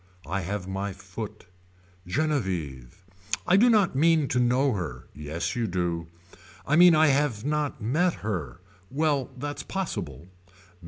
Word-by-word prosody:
I 100 +4 -2
have 95 +1 -4
my 95 +1 -3
foot. - - -8 0.6
Genevieve. 90 - -2 0.4
I 180 - +4
do 235 +5 +6
not 210 - +3
mean 160 0 +4
to 125 - +1
know 125 +3 +3
her. 75 -11 -5
Yes 75 - -4
you 120 -2 0
do. 85 -3 -2 0.6
I 150 - +2
mean 175 0 +8
I 155 -1 +5
have 135 -6 +1
not 150 -5 -1
met 165 +10 +2
her. 90 - -3 0.3
Well 145 -1 0
that's 145 +3 -4
possible. 85 - -4
120 Hz, 140 wpm, -26 LUFS, -, 0.6 s, mean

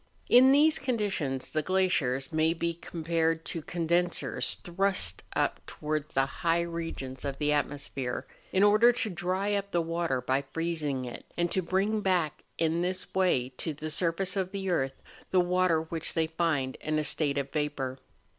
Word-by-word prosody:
In 255 +2 +8
these 300 +3 +5
conditions 200 - -1
the 155 - +1
glaciers 155 -7 +1
may 160 +1 +2
be 170 0 -1
compared 165 -1 -1
to 165 - -3
condensers 175 +2 0
thrust 175 - +1
up - - 0
towards 155 0 -3
the 135 0 +4 0.2
high 170 0 +3
regions 165 -6 -5
of 140 -1 -3
the 150 0 +1
atmosphere, 140 -3 -2 0.3
in 190 - +3
order 215 +4 +6
to 245 -2 -1
dry 185 +3 -1
up 200 0 -1
the 175 - +1
water 165 -4 -1
by 130 +2 0
freezing 150 -2 -2
it, 120 - -8
and 175 0 +1
to 190 - +1
bring 195 +5 0
back 180 -6 0
in 165 +1 +1
this 185 +1 -3
way 175 -10 +2
to 160 -3 -3
the 155 +2 -5
surface 175 +4 0
of 190 -2 -1
the 195 -2 -2
earth 135 -5 -1 0.3
the 185 - +3
water 180 -2 +2
which 160 0 -2
they 165 -1 +2
find 160 -5 -1
in 155 0 -2
a 155 - +1
state 145 -2 0
of 140 0 -2
vapour. 135 -3 -2
165 Hz, 170 wpm, -29 LUFS, 150-185 Hz, 0.3 s, In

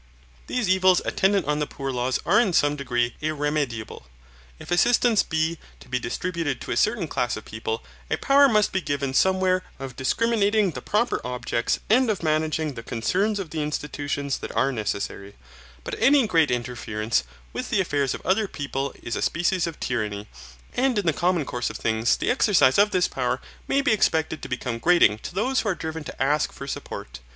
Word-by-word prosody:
These 250 -5 -1
evils 185 -1 +4
attendant 195 -3 +2
on 150 +1 0
the 150 - -1
poor 135 -1 -5
laws 125 0 0
are 195 +6 +5
in 210 -7 +2
some 145 -2 +3
degree 120 -4 -1
irremediable. 145 - -2 0.5
If - - -11
assistance 235 +4 +4
be 160 0 -1 0.2
to - - -15
be 125 0 -1
distributed 160 +2 -3
to - - -6
a - - 0
certain 215 -6 +1
class 120 -6 -1
of 110 - -9
people, 110 0 -4 0.3
a - - 0
power 280 0 +5
must 210 -3 +3
be 190 - 0
given 140 -4 -2
somewhere 185 +3 +3 0.2
of 135 -2 -7
discriminating 210 - +2
the - - -7
proper 235 +4 0
objects 125 -1 -1
and 245 +3 +4
of 205 -5 -1
managing 155 -1 0
the 115 - -7
concerns 185 - 0
of 190 -6 -5
the 160 - -2
institutions 145 -1 -3
that - - -6
are 135 +1 +2
necessary, 100 -3 -4 0.5
but - - -6
any 275 -1 +5
great 165 -7 +3
interference 115 -2 -1 0.3
with 250 - -4
the 215 - +1
affairs 145 -7 0
of - - -10
other 200 +4 +2
people 140 -4 -4
is 115 - -3
a - - -3
species 175 +1 +1
of 165 - -7
tyranny, 105 -4 -2 0.5
and 255 -2 +1
in 205 - 0
the 165 - +3
common 175 -1 +1
course 125 -1 -2
of - - -6
things 110 +1 +1
the - - 0
exercise 200 - +4
of 205 +1 +5
this 185 -3 +2
power - - -1 0.3
may 275 - +2
be 280 -2 +2
expected 160 -7 +1
to - - -7
become 125 -2 -3
grating 115 - +4
to 175 - -8
those 250 +6 +1
who 215 - -1
are 185 - 0
driven 160 -1 -5
to - - -9
ask 145 +2 +1
for 140 - -8
support. 100 - -6
155 Hz, 195 wpm, -24 LUFS, 130-195 Hz, 0.5 s, are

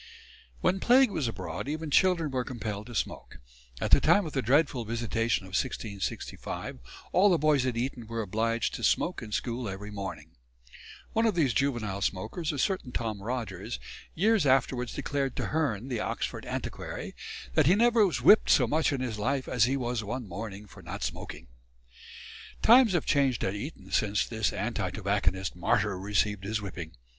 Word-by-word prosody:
When 190 - +2
plague 250 +1 +5
was 140 - -1
abroad 115 - -5
even 155 +1 -3
children 170 -3 +3
were 130 -1 0
compelled 110 -4 -5
to 120 - -9
smoke. - - -3 0.4
At - - -2
the - - +7
time 205 -2 +4
of 155 - -6
the 135 - +1
dreadful 135 0 +2
visitation 115 -2 -1
of - - -11
1665 100 - -4 0.3
all 195 +3 +5
the 175 - +4
boys 150 -4 +3
at 120 -2 -1
Eton 120 -1 -3
were 115 0 -3
obliged 115 +4 0
to - - -6
smoke 180 - +1
in 110 -2 -8
school 120 +1 -2
every 100 +2 -7
morning. 85 -6 -6 0.8
One 225 +1 +3
of 215 - +1
these 145 -8 +2
juvenile 115 -8 -1
smokers, 110 - -2
a 145 - -5
certain 140 -3 -1
Tom 110 -5 -3
Rogers, 110 -2 -4 0.4
years 205 -2 +3
afterwards 130 -2 +1
declared 135 -2 -2
to - - -2
Hearne, 135 -8 -1
the 125 -4 -2
Oxford - - -3
antiquary, - - -5 0.4
that - - +4
he 180 - +6
never 230 0 +5
was 190 - 0
whipped 215 - +7
so 130 - +6
much 155 +7 +1
in 135 -2 -2
his 115 -5 -3
life 130 +4 -1
as 120 -3 +3
he 135 +2 0
was 120 -3 -2
one 120 +2 -4
morning 100 +2 -6
for - - -14
not - - -6
smoking. - - -5 1.2
Times 235 -2 +7
have 175 - +1
changed 135 -5 +2
at 95 - 0
Eton 100 - -7
since 105 +1 +1
this 110 -2 -1
anti - - -2
tobacconist 95 +2 -1
martyr 100 +3 +1
received 105 0 0
his 110 +2 -1
whipping. 90 -5 -7
120 Hz, 175 wpm, -29 LUFS, 105-145 Hz, 1.2 s, the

